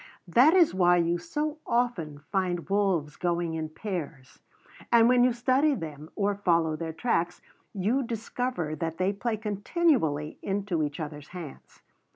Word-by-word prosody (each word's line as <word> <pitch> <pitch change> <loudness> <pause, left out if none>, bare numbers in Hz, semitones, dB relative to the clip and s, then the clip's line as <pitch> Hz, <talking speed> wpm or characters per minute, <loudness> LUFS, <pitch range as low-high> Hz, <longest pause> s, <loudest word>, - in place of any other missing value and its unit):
That 255 - +5
is 345 -4 +5
why 175 -1 +4
you 170 0 +1
so 300 - -3
often 175 -12 -1
find 180 -3 -1
wolves 190 -7 +1
going 170 -1 -1
in 160 -1 -3
pairs; 160 -7 -6 0.5
and 230 -1 +6
when 250 0 +5
you 250 - +4
study 260 +5 +2
them 155 - -7
or 205 0 +1
follow 170 -5 +1
their 160 0 -4
tracks 175 -2 -1 0.4
you 215 +8 +1
discover 230 - -3
that 165 +1 -3
they 185 +2 +1
play 220 +2 -2
continually 205 - 0
into 195 -4 -1
each 145 +1 -3
other's 150 -2 -6
hands. 175 -6 -10
185 Hz, 150 wpm, -28 LUFS, 160-235 Hz, 0.5 s, and